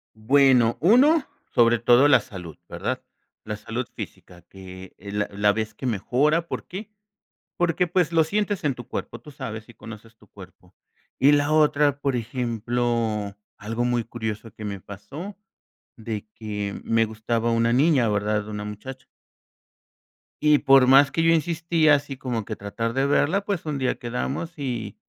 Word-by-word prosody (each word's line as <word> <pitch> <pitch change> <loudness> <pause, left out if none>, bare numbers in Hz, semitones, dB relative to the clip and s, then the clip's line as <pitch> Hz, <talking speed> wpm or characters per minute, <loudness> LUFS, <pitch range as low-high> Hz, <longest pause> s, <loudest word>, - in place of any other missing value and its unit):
Bueno, 125 0 +4
uno, 265 - +5 0.3
sobre 120 0 +4
todo 120 +4 +5
la 135 -4 +6
salud, 90 -7 -10
¿verdad? - - -4 0.4
La 105 0 -4
salud 115 +3 -5
física, 90 -1 -9
que 95 0 -12
es 100 +1 -9
la 105 0 -1
la 100 +1 +2
vez 110 +1 -3
que 130 - -7
mejora, 135 - +1
¿por - - -5
qué? 205 +4 -8 0.7
Porque, 175 +1 +1
pues, 175 -1 +1
lo 165 -1 +5
sientes 205 +3 -1
en 145 -4 0
tu 120 -2 -10
cuerpo, - - -6
tú 150 - -13
sabes 110 -5 -7
y - - -13
conoces 115 +1 -12
tu 105 - -23
cuerpo. 95 -2 -15 0.4
Y 140 +2 +5
la 145 0 +2
otra, 150 -2 +3
por 140 -2 -1
ejemplo, 115 -3 -2 0.2
algo 115 +4 -3
muy 120 -1 0
curioso 110 -1 -5
que 110 - -10
me 100 -1 -4
pasó, 140 - -9 0.6
de 110 -3 -6
que 105 -2 -5
me 115 0 +2
gustaba 115 +1 -2
una 115 0 +2
niña, 135 -2 +3
¿verdad? 105 0 -1
Una 105 -1 -5
muchacha 125 +6 -8 1.4
y 150 -1 +5
por 135 -2 +5
más 140 +2 +6
que 165 - 0
yo 165 0 +4
insistía, 165 -1 +2
así 140 -1 -4
como 120 -5 -3
que - - -5
tratar 115 +3 -4
de 135 +2 +1
verla, 155 +7 +2
pues, 200 -5 -3
un 150 -2 -2
día 130 -1 0
quedamos, 135 +7 -4
y 120 -7 -4
120 Hz, 165 wpm, -24 LUFS, 110-145 Hz, 1.4 s, la